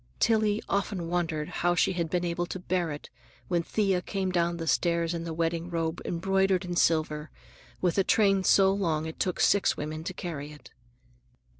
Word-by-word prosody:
Tillie 215 Hz, -2 st, +2 dB
often 195 Hz, -3 st, -1 dB
wondered 165 Hz, -3 st, -1 dB
how 175 Hz, 0 st, 0 dB
she 190 Hz, -, +2 dB
had 170 Hz, -2 st, -2 dB
been 175 Hz, +2 st, 0 dB
able 175 Hz, 0 st, -2 dB
to -, -, -5 dB
bear 180 Hz, -2 st, -1 dB
it 145 Hz, -, -8 dB, 0.4 s
when 175 Hz, -2 st, +2 dB
Thea 195 Hz, 0 st, 0 dB
came 190 Hz, 0 st, -2 dB
down 170 Hz, -1 st, +1 dB
the 165 Hz, -, -4 dB
stairs 170 Hz, 0 st, +1 dB
in 165 Hz, 0 st, -4 dB
the 165 Hz, -, -4 dB
wedding 165 Hz, +1 st, -1 dB
robe 165 Hz, -1 st, -2 dB
embroidered 190 Hz, +1 st, +1 dB
in 175 Hz, 0 st, -4 dB
silver, 155 Hz, -2 st, +1 dB, 0.5 s
with 180 Hz, +1 st, +1 dB
a -, -, +4 dB
train 195 Hz, -1 st, +3 dB
so 195 Hz, 0 st, +5 dB
long 165 Hz, -6 st, 0 dB
it 160 Hz, -, -7 dB
took 185 Hz, -, -1 dB
six 200 Hz, -, +3 dB
women 155 Hz, +1 st, -4 dB
to 185 Hz, -, -3 dB
carry 150 Hz, -6 st, -5 dB
it. 150 Hz, -, -14 dB
175 Hz, 185 wpm, -28 LUFS, 165-190 Hz, 0.5 s, so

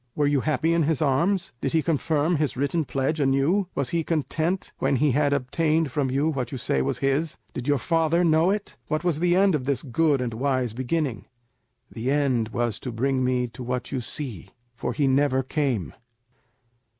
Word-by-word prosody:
Were 150 Hz, -, +2 dB
you 145 Hz, -2 st, +2 dB
happy 155 Hz, +3 st, +1 dB
in 170 Hz, -, +2 dB
his 155 Hz, -2 st, +1 dB
arms? 170 Hz, +7 st, +1 dB
Did 135 Hz, -, -1 dB
he 160 Hz, -1 st, +2 dB
confirm 160 Hz, +1 st, +1 dB
his 145 Hz, -4 st, -1 dB
written 145 Hz, +4 st, 0 dB
pledge 135 Hz, +4 st, -1 dB
anew? 140 Hz, +8 st, +2 dB
Was 140 Hz, -3 st, -1 dB
he 170 Hz, -1 st, 0 dB
content 165 Hz, +3 st, -1 dB
when -, -, +1 dB
he 145 Hz, +2 st, +3 dB
had 145 Hz, +2 st, +2 dB
obtained 150 Hz, +3 st, +1 dB
from 135 Hz, 0 st, 0 dB
you 140 Hz, +4 st, +1 dB
what 135 Hz, -5 st, -3 dB
you 135 Hz, -, -4 dB
say 70 Hz, -, 0 dB
was -, -, -1 dB
his? 145 Hz, +4 st, 0 dB, 0.2 s
Did 125 Hz, +1 st, -5 dB
your 145 Hz, -1 st, +3 dB
father 165 Hz, +4 st, +1 dB
know 160 Hz, +1 st, +4 dB
it? 205 Hz, +1 st, -3 dB
What 155 Hz, +1 st, -1 dB
was 170 Hz, -4 st, +1 dB
the 175 Hz, +1 st, +3 dB
end 195 Hz, 0 st, +4 dB
of 140 Hz, -5 st, -1 dB
this 135 Hz, -2 st, -1 dB
good 145 Hz, +1 st, +2 dB
and 125 Hz, -2 st, -2 dB
wise 130 Hz, -1 st, 0 dB
beginning?" 130 Hz, -1 st, -2 dB, 0.7 s
"The 120 Hz, +2 st, -3 dB
end 135 Hz, -6 st, +1 dB
was 120 Hz, -2 st, -2 dB
to 125 Hz, -, -5 dB
bring 130 Hz, +3 st, 0 dB
me 125 Hz, -1 st, +1 dB
to 125 Hz, -, -11 dB
what 125 Hz, 0 st, -3 dB
you 130 Hz, -, -2 dB
see, 120 Hz, -, -7 dB, 0.3 s
for 125 Hz, -, -3 dB
he 145 Hz, -, 0 dB
never 135 Hz, 0 st, +2 dB
came." 125 Hz, -, -1 dB
140 Hz, 200 wpm, -25 LUFS, 130-160 Hz, 0.7 s, know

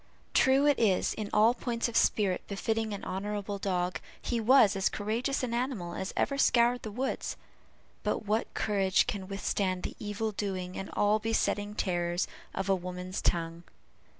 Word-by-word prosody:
True 265 Hz, +2 st, +4 dB
it 290 Hz, -2 st, +4 dB
is, 205 Hz, -5 st, +2 dB
in 210 Hz, -2 st, -5 dB
all 220 Hz, +3 st, +5 dB
points 235 Hz, -1 st, -2 dB
of 235 Hz, -, -7 dB
spirit 200 Hz, -5 st, +2 dB
befitting 220 Hz, +2 st, -1 dB
in 200 Hz, -, -5 dB
honorable 205 Hz, +1 st, -3 dB
dog, 180 Hz, -2 st, -1 dB, 0.2 s
he 240 Hz, -, -2 dB
was 225 Hz, -3 st, +5 dB
as 195 Hz, 0 st, +2 dB
courageous 235 Hz, +7 st, -1 dB
an 240 Hz, -2 st, -2 dB
animal 235 Hz, -8 st, -2 dB
as 190 Hz, -, -4 dB
ever 275 Hz, -1 st, +1 dB
scoured 240 Hz, -1 st, +4 dB
the 220 Hz, -, -5 dB
woods 255 Hz, +6 st, -3 dB, 0.6 s
but -, -, -1 dB
what 215 Hz, +2 st, 0 dB
courage 195 Hz, -3 st, +2 dB
can 195 Hz, -2 st, -4 dB
withstand 195 Hz, -1 st, -1 dB
the -, -, -4 dB
evil 210 Hz, +1 st, -2 dB
doing 185 Hz, -3 st, -4 dB
and 195 Hz, -, -5 dB
all 210 Hz, +1 st, +3 dB
besetting 210 Hz, -2 st, 0 dB
terrors 175 Hz, -2 st, 0 dB, 0.3 s
of 195 Hz, -, -2 dB
a 195 Hz, -, +4 dB
woman's 180 Hz, 0 st, -4 dB
tongue? 165 Hz, 0 st, -1 dB
205 Hz, 165 wpm, -30 LUFS, 190-225 Hz, 0.6 s, all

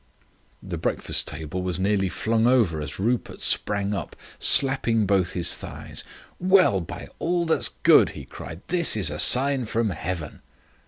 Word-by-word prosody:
The -, -, -6 dB
breakfast -, -, -1 dB
table 80 Hz, +4 st, -6 dB
was 90 Hz, -2 st, -3 dB
nearly 95 Hz, 0 st, 0 dB
flung 115 Hz, +4 st, 0 dB
over 110 Hz, -12 st, +1 dB
as 75 Hz, 0 st, -7 dB
Rupert 120 Hz, +4 st, -2 dB
sprang 105 Hz, 0 st, -1 dB
up, 95 Hz, -6 st, -6 dB, 0.2 s
slapping 125 Hz, -5 st, +4 dB
both 95 Hz, -3 st, 0 dB
his 90 Hz, -2 st, +2 dB
thighs. -, -, -7 dB, 0.4 s
"Well, 185 Hz, -, +3 dB
by 85 Hz, -, -9 dB
all 175 Hz, +1 st, -1 dB
that's 160 Hz, -, +1 dB
good," -, -, +4 dB
he -, -, -9 dB
cried. 85 Hz, +2 st, -10 dB
"This 170 Hz, -9 st, +4 dB
is 90 Hz, -8 st, +1 dB
a 75 Hz, -, -6 dB
sign 135 Hz, 0 st, +4 dB
from 110 Hz, -1 st, -2 dB
heaven." 80 Hz, -2 st, -6 dB
105 Hz, 155 wpm, -23 LUFS, 90-125 Hz, 0.4 s, slapping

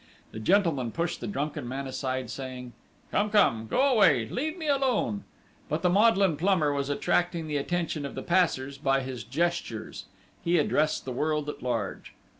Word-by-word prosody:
The 110 Hz, -, -7 dB
gentleman 150 Hz, -, +2 dB
pushed 170 Hz, +4 st, -2 dB
the -, -, -4 dB
drunken 150 Hz, -9 st, -3 dB
man 135 Hz, +2 st, -4 dB
aside, 130 Hz, -2 st, -3 dB
saying: 125 Hz, -2 st, -7 dB, 0.4 s
"Come! 210 Hz, +1 st, +1 dB
Come! 115 Hz, -, +3 dB
Go 255 Hz, -, +1 dB
away!... 155 Hz, -, +4 dB
Leave 310 Hz, +6 st, -3 dB
me 320 Hz, -3 st, -5 dB
alone!" 255 Hz, -, +1 dB, 0.4 s
But 155 Hz, +3 st, -2 dB
the 180 Hz, -, +4 dB
maudlin 195 Hz, -4 st, +4 dB
plumber 165 Hz, -5 st, +2 dB
was 140 Hz, 0 st, -2 dB
attracting 170 Hz, +3 st, 0 dB
the 150 Hz, -1 st, -2 dB
attention 165 Hz, 0 st, -2 dB
of 140 Hz, -, -6 dB
the -, -, -5 dB
passers 140 Hz, -7 st, +1 dB
by 135 Hz, -1 st, +2 dB
his 130 Hz, -3 st, -6 dB
gestures. 135 Hz, -4 st, -2 dB, 0.4 s
He 170 Hz, +1 st, +2 dB
addressed 155 Hz, 0 st, +1 dB
the 130 Hz, -, -4 dB
world 150 Hz, +3 st, -1 dB
at -, -, -7 dB
large. 115 Hz, -5 st, -3 dB
150 Hz, 170 wpm, -28 LUFS, 130-175 Hz, 0.4 s, away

